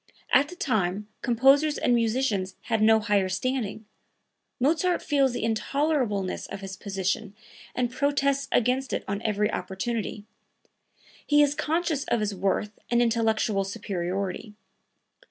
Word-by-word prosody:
At 285 +2 +5
the 360 - -9
time 210 - -1
composers 270 +5 +4
and 245 - +2
musicians 225 -5 0
had 225 -2 0
no 220 +1 +6
higher 205 -3 +1
standing. 220 +1 -2 0.7
Mozart 335 +7 +2
feels 275 -3 +2
the 245 - -4
intolerableness 230 -3 0
of 195 - -6
his 195 0 -6
position 195 0 -3 0.4
and 245 -1 0
protests 280 +1 +1
against 255 +3 +1
it - - -1
on 200 +1 -2
every 210 -1 0
opportunity; 205 +3 -3 1.0
he 295 0 +5
is 285 -1 +2
conscious 315 -1 -1
of 235 - +1
his 210 -1 -1
worth 195 +2 -1
and 240 - +3
intellectual 225 -3 +1
superiority. 195 +1 -4
225 Hz, 130 wpm, -26 LUFS, 200-270 Hz, 1.0 s, no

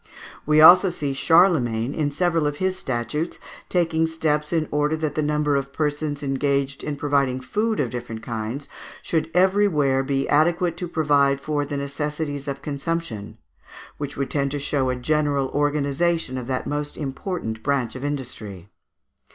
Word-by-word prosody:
We 155 0 +5
also 180 +4 +9
see 145 -5 -3
Charlemagne, 135 -7 +3
in 150 -2 0
several 165 +1 +1
of 145 - -2
his 185 +4 -1
statutes, 135 - -3 0.3
taking 165 -2 +1
steps 150 -2 -1
in 160 -3 +1
order 150 +1 +1
that 155 -2 -2
the 155 - 0
number 150 -1 +1
of 135 0 -2
persons 145 -1 -2
engaged 140 0 -1
in 150 - -3
providing 140 -3 +1
food 215 - -1
of 125 -5 0
different 120 -2 -6
kinds 115 +5 -4 0.4
should 160 -1 -1
everywhere 180 -8 +3
be 135 0 -1
adequate 170 +3 +2
to 180 - -3
provide 145 -4 +2
for 145 0 -2
the 145 - -3
necessities 145 0 -3
of 140 0 -4
consumption, 140 -8 -4 0.6
which 145 0 -5
would 140 - -2
tend 140 -1 +1
to 145 - -3
show 140 -2 0
a 130 - 0
general 140 0 0
organization 145 +1 0
of 125 -2 -5
that 130 -1 -2
most 145 0 -3
important 135 - -4
branch 130 -3 -1
of 130 - -7
industry. 110 -9 -5
145 Hz, 160 wpm, -23 LUFS, 135-155 Hz, 0.6 s, also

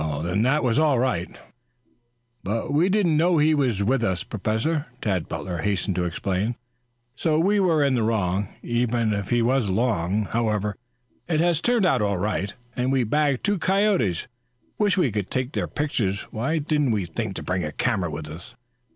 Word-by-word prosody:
"Then 90 +5 0
that 135 +6 +2
was 125 +1 +2
all 150 -4 +3
right." 120 -8 -1 1.0
"But 110 +7 -2
we 165 +6 +3
didn't 185 -6 +2
know 170 +2 +3
he 155 +1 +4
was 125 -9 +1
with 125 +3 +1
us, 95 -5 0
Professor," 110 - -1
Tad 95 -6 -1
Butler 90 -3 -4
hastened 100 0 -1
to 90 -1 0
explain. 95 +6 -1 0.6
"So 155 +2 +1
we 200 +6 +3
were 165 -6 +3
in 140 -2 +2
the 120 - +1
wrong, 100 -3 0 0.2
even 120 -2 0
if 100 -1 -3
he 120 -1 +2
was 125 -1 +2
along. 100 -1 0
However, 105 -3 0 0.5
it 160 -3 +1
has 170 -1 +2
turned 240 -2 +2
out 180 - +3
all 100 -2 +1
right, 100 +1 -1 0.2
and 125 +1 0
we've 125 -5 +1
bagged 145 -3 +2
two 205 -2 +1
coyotes. 185 - +1 0.5
Wish 205 -2 +2
we 155 -10 +2
could 105 -2 -3
take 130 +1 -2
their - - -2
pictures. 110 -9 -1
Why 130 +9 -1
didn't 150 -2 +1
we 105 -5 0
think 85 - -4
to - - -5
bring 90 0 -1
a 75 - -3
camera 100 -6 0
with 75 0 -6
us?" 80 +3 -10
120 Hz, 185 wpm, -24 LUFS, 100-150 Hz, 1.0 s, he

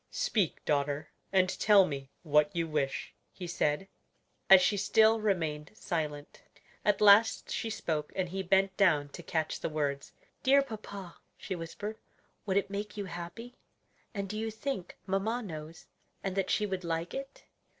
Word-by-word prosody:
"Speak, 200 -8 0
daughter, 145 0 0 0.2
and 185 -1 +4
tell 205 -3 +6
me 135 -4 -5
what 150 0 +3
you 165 -1 0
wish," 145 -3 -2 0.2
he 180 - -8
said, 170 +1 0 0.6
as 190 -1 +11
she 185 +3 +2
still 220 +2 +4
remained 160 -8 -1
silent. 150 -7 -4 0.4
At 210 0 +2
last 210 +2 +6
she 225 - -2
spoke, 160 -8 -2
and 185 -2 -1
he 190 +2 -3
bent 190 +1 +2
down 155 -8 +3
to 155 - -9
catch 160 -1 -2
the - - -2
words. 145 -2 -2 0.3
"Dear 275 +1 +5
papa," 200 -7 -8 0.2
she - - -5
whispered, 205 +6 -6 0.5
"would 190 0 +2
it 200 0 0
make 210 +1 -4
you 205 - -3
happy? 190 +7 -7 0.6
and 200 -2 -4
do 215 +2 -4
you 225 0 -2
think 220 -3 -5
mamma 210 +6 -1
knows, 160 -3 -8 0.4
and 195 -1 -2
that 195 -1 0
she 210 - +2
would 190 -2 -3
like 165 0 -2
it?" 275 0 -7
190 Hz, 160 wpm, -31 LUFS, 155-210 Hz, 0.6 s, as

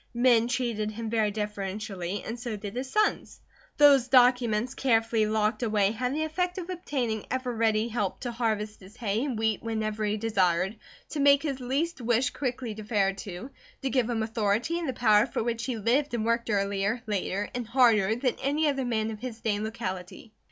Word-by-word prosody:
Men 235 -1 +4
treated 235 -4 -1
him 220 +1 -5
very 220 -2 +2
deferentially, 205 -2 -4
and 230 +2 -5
so 230 -2 -4
did 205 +1 -7
his 260 +1 -3
sons. 425 +7 0 0.4
Those 280 -4 +6
documents 245 -2 +4
carefully 225 -4 +2
locked 215 +2 0
away 210 -4 +2
had 250 +3 -2
the 310 - 0
effect 360 +3 -2
of 370 0 -5
obtaining 255 - -3
ever 255 -1 -2
ready 220 0 +2
help 210 -5 -2
to 245 - -3
harvest 215 -3 -2
his 195 +3 -15
hay 220 0 -1
and 265 -6 -2
wheat 220 -1 0
whenever 220 -1 -2
he 210 0 0
desired, 195 -3 +1 0.3
to 305 - -4
make 280 0 +5
his 275 -4 -2
least 275 +5 -2
wish 240 +2 +1
quickly 250 -4 -3
deferred 205 -2 0
to, 200 +7 -7 0.3
to 270 - 0
give 250 -3 +1
him 225 -2 0
authority 225 +8 0
and 330 -5 -3
the - - -1
power 215 -3 +4
for - - -2
which 230 -1 -2
he 250 -3 -2
lived 240 +5 +1
and 220 -2 -1
worked 235 0 0
earlier, 200 +2 0
later, 205 -1 -2
and 245 -2 -4
harder 225 -4 +4
than 245 +1 0
any 290 +3 +1
other 275 -3 0
man 225 -2 -1
of 215 - -7
his 240 -1 -6
day 220 -2 0
and 205 - -3
locality. 215 -1 -6
225 Hz, 195 wpm, -28 LUFS, 210-255 Hz, 0.4 s, Those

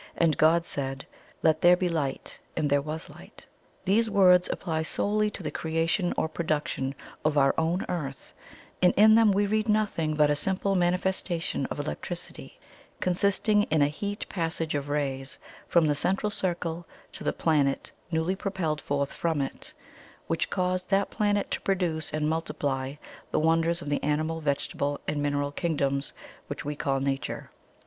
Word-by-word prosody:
And 165 -3 +3
God 165 +2 +4
said, 135 -2 -3 0.4
Let 160 0 +3
there 175 +1 +7
be 180 - 0
light. 155 -6 -3 0.2
And 150 - +1
there 145 0 +4
was 155 +2 -5
light.' - - -13 0.4
"These 220 +4 +3
words 180 -3 +5
apply 160 -3 -2
SOLELY 210 +6 +1
to - - -8
the - - -3
creation 165 +3 0
or - - +1
production 150 -4 -2 0.3
of 150 -1 +1
OUR 135 -1 +5
OWN 165 +3 0
EARTH, 140 -6 -5 0.5
and 180 - +5
in 215 +2 +8
them 225 -1 +6
we 200 +1 +2
read 215 +2 0
nothing 200 -8 +1
but 150 -1 +4
a - - +3
simple 190 +5 0
manifestation 180 -1 0
of - - -5
electricity, - - -6 0.4
consisting 200 +3 +2
in 155 -2 +3
a - - +4
HEATING 205 +7 -4
PASSAGE 165 -3 -2
OF 145 -1 -2
RAYS 135 -2 -2 0.3
from 170 -2 +4
the 150 - +3
Central 195 +7 +1
Circle 175 -3 -2 0.2
to - - -7
the - - +1
planet 145 -4 +1 0.2
newly 165 +2 0
propelled 185 -6 -2
forth 140 0 -1
from 165 -3 -1
it, 135 - -4 0.5
which - - -1
caused 185 0 -1
that 195 0 +2
planet 205 -2 0
to - - -1
produce 175 -5 0
and 150 0 0
multiply 140 -4 -2 0.3
the - - -1
wonders 165 +2 +2
of 145 - -5
the 145 - 0
animal, 155 +2 -1
vegetable, 145 0 -1
and 150 -1 -1
mineral 145 0 0
kingdoms 140 -4 -1 0.4
which - - -5
we 150 +1 -2
call 135 -1 0
Nature. 135 -2 -3
160 Hz, 165 wpm, -27 LUFS, 145-185 Hz, 0.5 s, in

